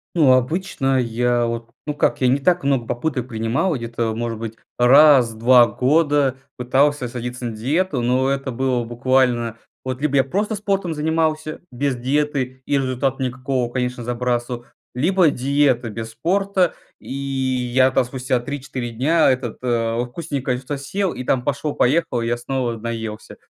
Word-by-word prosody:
Ну 145 Hz, -6 st, +5 dB
обычно 135 Hz, -1 st, 0 dB
я 120 Hz, 0 st, +1 dB
вот 115 Hz, 0 st, -4 dB
ну 150 Hz, -, -2 dB
как, 145 Hz, -, 0 dB
я 130 Hz, -, +4 dB
не 135 Hz, +3 st, +3 dB
так 175 Hz, +3 st, +2 dB
много 135 Hz, -4 st, +1 dB
попыток 125 Hz, 0 st, -2 dB
принимал, 120 Hz, +9 st, -1 dB
где-то 115 Hz, -2 st, -2 dB
может 115 Hz, -1 st, -3 dB
быть 115 Hz, -1 st, -6 dB, 0.2 s
раз 130 Hz, -1 st, +6 dB
в -, -, -13 dB
2 120 Hz, +1 st, +6 dB
года 145 Hz, -1 st, +2 dB, 0.2 s
пытался 135 Hz, +2 st, +1 dB
садиться 125 Hz, +1 st, -6 dB
на 115 Hz, -2 st, -4 dB
диету, 145 Hz, +5 st, 0 dB
но 130 Hz, +2 st, +1 dB
это 135 Hz, -1 st, -2 dB
было 125 Hz, -1 st, 0 dB
буквально, 120 Hz, -1 st, +1 dB, 0.3 s
вот 130 Hz, 0 st, -4 dB
либо 145 Hz, -2 st, +1 dB
я 135 Hz, -, +5 dB
просто 205 Hz, -, -1 dB
спортом 195 Hz, -4 st, -1 dB
занимался, 155 Hz, 0 st, -1 dB
без 135 Hz, +2 st, -1 dB
диеты 130 Hz, 0 st, -1 dB
и -, -, -3 dB
результата 135 Hz, 0 st, -1 dB
никакого, 130 Hz, -1 st, -2 dB
конечно, 125 Hz, -1 st, -2 dB
забрасывал, 120 Hz, 0 st, -2 dB, 0.3 s
либо 170 Hz, +5 st, +3 dB
диета 135 Hz, -3 st, +1 dB
без 110 Hz, +1 st, -6 dB
спорта. 185 Hz, -, +1 dB, 0.3 s
И -, -, -8 dB
я 130 Hz, -2 st, +1 dB
там 130 Hz, -, +3 dB
спустя 125 Hz, 0 st, -1 dB
3-4 130 Hz, -2 st, -5 dB
дня 150 Hz, +8 st, +2 dB
этот, 130 Hz, -3 st, -2 dB
э, 115 Hz, -1 st, 0 dB
вкусненькое 135 Hz, -2 st, -3 dB
что-то 135 Hz, +3 st, -5 dB
съел, 190 Hz, +7 st, -2 dB
и 125 Hz, -, -6 dB
там 125 Hz, 0 st, 0 dB
пошло-поехало, 145 Hz, -1 st, 0 dB
я 120 Hz, +1 st, -1 dB
снова 120 Hz, -1 st, -2 dB
наелся 110 Hz, -1 st, -6 dB
130 Hz, 155 wpm, -21 LUFS, 120-145 Hz, 0.3 s, раз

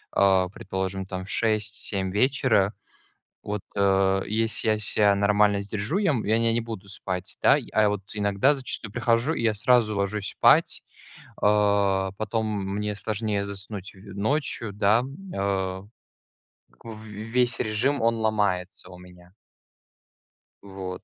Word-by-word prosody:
э, 95 Hz, -2 st, +4 dB
предположим, 95 Hz, -1 st, -4 dB
там 95 Hz, 0 st, -6 dB
в -, -, -12 dB
6-7 105 Hz, -3 st, -1 dB
вечера. 110 Hz, -3 st, +2 dB, 0.7 s
Вот, 105 Hz, -1 st, -4 dB
э, 95 Hz, -1 st, +3 dB
если 110 Hz, +1 st, 0 dB
я 110 Hz, -, +2 dB
ся 105 Hz, -1 st, +3 dB
нормально 100 Hz, 0 st, +3 dB
сдержу, 105 Hz, -, -2 dB
я 200 Hz, -5 st, +2 dB
м 120 Hz, -6 st, -1 dB
я 110 Hz, +2 st, +2 dB
не 115 Hz, 0 st, +2 dB
не 120 Hz, -, +1 dB
буду 110 Hz, -4 st, -8 dB
спать, 95 Hz, -2 st, -5 dB
да. -, -, +6 dB, 0.2 s
А 110 Hz, -1 st, +4 dB
вот 105 Hz, -1 st, -2 dB
иногда 100 Hz, +6 st, +2 dB
зачастую 120 Hz, -6 st, -4 dB
прихожу 115 Hz, +6 st, +1 dB
и 115 Hz, -, -3 dB
я 110 Hz, -2 st, +2 dB
сразу 110 Hz, 0 st, +2 dB
ложусь 100 Hz, +1 st, -1 dB
спать, -, -, +3 dB, 0.6 s
а, 100 Hz, -2 st, +2 dB
потом 110 Hz, +1 st, -1 dB, 0.3 s
мне 105 Hz, 0 st, -2 dB
сложнее 105 Hz, 0 st, -2 dB
заснуть 100 Hz, 0 st, -7 dB
ночью, 105 Hz, +4 st, -3 dB
да, 105 Hz, +3 st, +3 dB, 0.3 s
э. 95 Hz, -1 st, -1 dB, 1.0 s
В 110 Hz, -1 st, -10 dB
весь 115 Hz, +4 st, -1 dB
режим 120 Hz, +7 st, 0 dB
он 115 Hz, 0 st, +2 dB
ломается 100 Hz, -4 st, -1 dB
у 90 Hz, -, -11 dB
меня. 90 Hz, 0 st, -16 dB, 1.3 s
Вот. 95 Hz, -2 st, -7 dB
105 Hz, 135 wpm, -25 LUFS, 95-110 Hz, 1.3 s, да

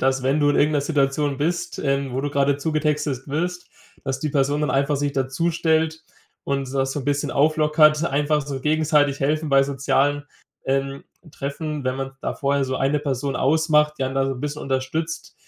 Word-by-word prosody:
dass 135 Hz, 0 st, +1 dB
wenn 135 Hz, +3 st, +1 dB
du 145 Hz, -, +3 dB
in -, -, +1 dB
irgend 150 Hz, +2 st, +3 dB
'ner 145 Hz, -, +2 dB
Situation 140 Hz, -1 st, 0 dB
bist, 170 Hz, +4 st, -2 dB
ähm, 140 Hz, -1 st, -1 dB
wo 130 Hz, -, -1 dB
du 145 Hz, +1 st, -2 dB
gerade 140 Hz, 0 st, +2 dB
zugetextet 150 Hz, -3 st, -1 dB
wirst, 180 Hz, +4 st, -3 dB, 0.4 s
dass 135 Hz, -1 st, -2 dB
die 155 Hz, -, -1 dB
Person 145 Hz, +1 st, +1 dB
dann 150 Hz, -, 0 dB
einfach 140 Hz, +1 st, +1 dB
sich 145 Hz, 0 st, -1 dB
dazustellt 160 Hz, +3 st, 0 dB, 0.4 s
und 135 Hz, -1 st, -2 dB
das 135 Hz, -1 st, 0 dB
so 145 Hz, -, -3 dB
'n -, -, -8 dB
bisschen 145 Hz, 0 st, 0 dB
auflockert, 155 Hz, +1 st, +4 dB
einfach 150 Hz, 0 st, +1 dB
so 135 Hz, -1 st, -5 dB
gegenseitig 150 Hz, -1 st, +2 dB
helfen 155 Hz, +3 st, 0 dB
bei 135 Hz, -1 st, +5 dB
sozialen, 140 Hz, +1 st, 0 dB, 0.4 s
ähm, 135 Hz, +1 st, -1 dB, 0.3 s
Treffen, 150 Hz, +1 st, -4 dB
wenn 130 Hz, 0 st, -1 dB
man 135 Hz, 0 st, -4 dB
da -, -, -2 dB
vorher 140 Hz, 0 st, 0 dB
so 130 Hz, 0 st, -2 dB
1 140 Hz, +2 st, +1 dB
Person 140 Hz, -1 st, -2 dB
ausmacht, 150 Hz, +1 st, +2 dB
die 135 Hz, -, 0 dB
einen 130 Hz, 0 st, -3 dB
da 135 Hz, 0 st, +2 dB
so 135 Hz, -, -1 dB
'n 125 Hz, -, -7 dB
bisschen 150 Hz, +1 st, -4 dB
unterstützt, 135 Hz, +5 st, -3 dB
145 Hz, 195 wpm, -22 LUFS, 135-150 Hz, 0.4 s, bei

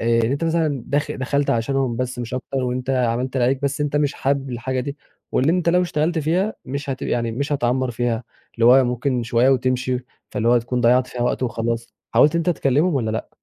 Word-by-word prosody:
آآ 115 Hz, 0 st, +2 dB
إن 115 Hz, -, 0 dB
أنت 140 Hz, +4 st, -1 dB
مثلًا 160 Hz, -5 st, 0 dB
داخل 145 Hz, 0 st, -1 dB
دخَلت 140 Hz, +2 st, 0 dB
عشانهم 120 Hz, +1 st, 0 dB
بس 125 Hz, 0 st, -3 dB
مش 120 Hz, +1 st, -4 dB
أكتر 135 Hz, +1 st, -5 dB
وأنت 125 Hz, +1 st, -2 dB
عملت 125 Hz, +1 st, 0 dB
اللي 125 Hz, -, +2 dB
عليك 135 Hz, +2 st, +1 dB
بس 140 Hz, +1 st, -1 dB
أنت 145 Hz, 0 st, 0 dB
مش 145 Hz, -1 st, +1 dB
حابب 135 Hz, 0 st, -1 dB
الحاجة 130 Hz, +2 st, -2 dB
دي 140 Hz, +3 st, -5 dB, 0.4 s
واللي 150 Hz, +6 st, +3 dB
أنت 175 Hz, -2 st, +1 dB
لو 180 Hz, +1 st, +4 dB
اشتغلت 165 Hz, -1 st, 0 dB
فيها 180 Hz, +8 st, 0 dB
مش 140 Hz, +1 st, -4 dB
هتب 130 Hz, -, -4 dB
يعني 115 Hz, -1 st, -1 dB
مش 140 Hz, +5 st, -2 dB
هتعمّر 130 Hz, -1 st, 0 dB
فيها 120 Hz, 0 st, -2 dB, 0.3 s
اللي 115 Hz, -, 0 dB
هو 130 Hz, +1 st, +7 dB
ممكن 125 Hz, 0 st, -1 dB
شوية 120 Hz, +2 st, +2 dB
وتمشي، 130 Hz, -1 st, +1 dB, 0.3 s
فاللي 115 Hz, +2 st, 0 dB
هو -, -, +5 dB
هتكون 120 Hz, +1 st, 0 dB
ضيّعت 125 Hz, +1 st, +4 dB
فيها 120 Hz, -1 st, -4 dB
وقت 125 Hz, +1 st, 0 dB
وخلاص. 115 Hz, -1 st, -2 dB, 0.2 s
حاولت 145 Hz, +7 st, +5 dB
إن -, -, +3 dB
أنت 170 Hz, +2 st, +1 dB
تكلمهم 150 Hz, +2 st, +1 dB
والّا 115 Hz, -5 st, 0 dB
لأ؟ 110 Hz, -, -3 dB
130 Hz, 220 wpm, -21 LUFS, 120-140 Hz, 0.4 s, هو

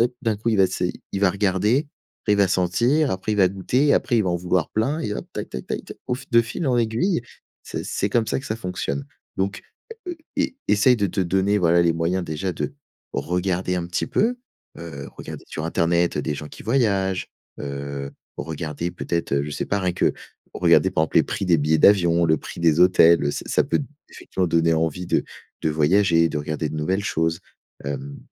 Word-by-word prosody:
Ah, 120 Hz, -, +6 dB, 0.2 s
d'un 110 Hz, -3 st, +1 dB
coup 115 Hz, +3 st, -3 dB
il 110 Hz, -, +2 dB
va 95 Hz, -, +6 dB
se 90 Hz, 0 st, -2 dB, 0.3 s
il 100 Hz, -, -2 dB
va 95 Hz, -2 st, +4 dB
regarder, 105 Hz, +8 st, +1 dB, 0.3 s
après, 105 Hz, -, +1 dB
il -, -, 0 dB
va 100 Hz, -2 st, +4 dB
sentir, 120 Hz, -, +2 dB
après 95 Hz, +3 st, -2 dB
il -, -, -1 dB
va 95 Hz, -2 st, +6 dB
goûter 120 Hz, +9 st, 0 dB
et -, -, +6 dB
après 120 Hz, -, +1 dB
il -, -, +3 dB
va 90 Hz, -, +1 dB
en 85 Hz, -, +1 dB
vouloir 90 Hz, -1 st, 0 dB
plein 135 Hz, +9 st, 0 dB
et 105 Hz, -10 st, -2 dB
hop! -, -, -6 dB
Tac, -, -, -5 dB
tac, 65 Hz, -, -6 dB
tac, -, -, -4 dB
tac, -, -, -10 dB
au -, -, 0 dB
fi 130 Hz, +2 st, -9 dB
de 115 Hz, -, +6 dB
fil 125 Hz, +8 st, -4 dB
en 125 Hz, -2 st, +2 dB
aiguille, 120 Hz, -, +1 dB, 0.4 s
ce -, -, -5 dB
c'est 100 Hz, -, -1 dB
comme 115 Hz, -1 st, +2 dB
ça 130 Hz, -, 0 dB
que 135 Hz, -, -10 dB
ça 110 Hz, -, -2 dB
fonctionne. 90 Hz, -9 st, -4 dB, 0.3 s
Donc, 100 Hz, +2 st, -2 dB, 0.5 s
heu, 350 Hz, -, -4 dB, 0.2 s
é 285 Hz, -, 0 dB
essaye 105 Hz, +4 st, +5 dB
de 100 Hz, -2 st, +1 dB
te 95 Hz, -, -2 dB
donner, 95 Hz, +3 st, +2 dB
voilà, 85 Hz, -1 st, +4 dB
les 85 Hz, -1 st, +3 dB
moyens, 85 Hz, +2 st, 0 dB
déjà, 80 Hz, +4 st, -3 dB
de 135 Hz, -, -4 dB, 0.4 s
regarder 90 Hz, +1 st, -1 dB
un 85 Hz, -1 st, -2 dB
petit 90 Hz, -, -2 dB
peu, 240 Hz, +4 st, +1 dB, 0.4 s
heu, 70 Hz, -5 st, -7 dB
regarder -, -, -8 dB
sur 80 Hz, -, -5 dB
internet, 85 Hz, +1 st, +1 dB
heu, -, -, 0 dB
des 75 Hz, -, -2 dB
gens 75 Hz, +1 st, -7 dB
qui -, -, -12 dB
voyagent, 100 Hz, -6 st, +1 dB, 0.3 s
heu, 70 Hz, 0 st, -5 dB, 0.3 s
regarder 80 Hz, +1 st, -4 dB
peut-être, 85 Hz, -3 st, -3 dB
heu, 70 Hz, -, +2 dB
je 75 Hz, -, -6 dB
sais 75 Hz, -, -3 dB
pas, 100 Hz, -, 0 dB
rien 90 Hz, -1 st, 0 dB
que -, -, +1 dB, 0.4 s
regarder, -, -, +4 dB
par 80 Hz, -, +1 dB
exemple, -, -, -4 dB
les -, -, +5 dB
prix 95 Hz, -, -3 dB
des 85 Hz, -3 st, +4 dB
billets 75 Hz, +2 st, +2 dB
d'avion, 85 Hz, -2 st, +5 dB
le 80 Hz, -1 st, +3 dB
prix -, -, -9 dB
des 85 Hz, 0 st, +3 dB
hôtels, 85 Hz, -2 st, +6 dB
heu, 70 Hz, -, +1 dB
ça -, -, -5 dB
ça -, -, +2 dB
peut, -, -, 0 dB, 0.3 s
effectivement, 90 Hz, -1 st, -3 dB
donner 80 Hz, 0 st, +3 dB
envie 80 Hz, +2 st, -1 dB
de -, -, +1 dB, 0.4 s
de 80 Hz, -, +1 dB
voyager, 85 Hz, +2 st, +3 dB
de 80 Hz, -, -4 dB
regarder 75 Hz, +1 st, -3 dB
de -, -, -6 dB
nouvelles 95 Hz, +6 st, 0 dB
choses, 80 Hz, -4 st, 0 dB, 0.4 s
hem, 70 Hz, 0 st, -5 dB
90 Hz, 225 wpm, -23 LUFS, 80-105 Hz, 0.5 s, Ah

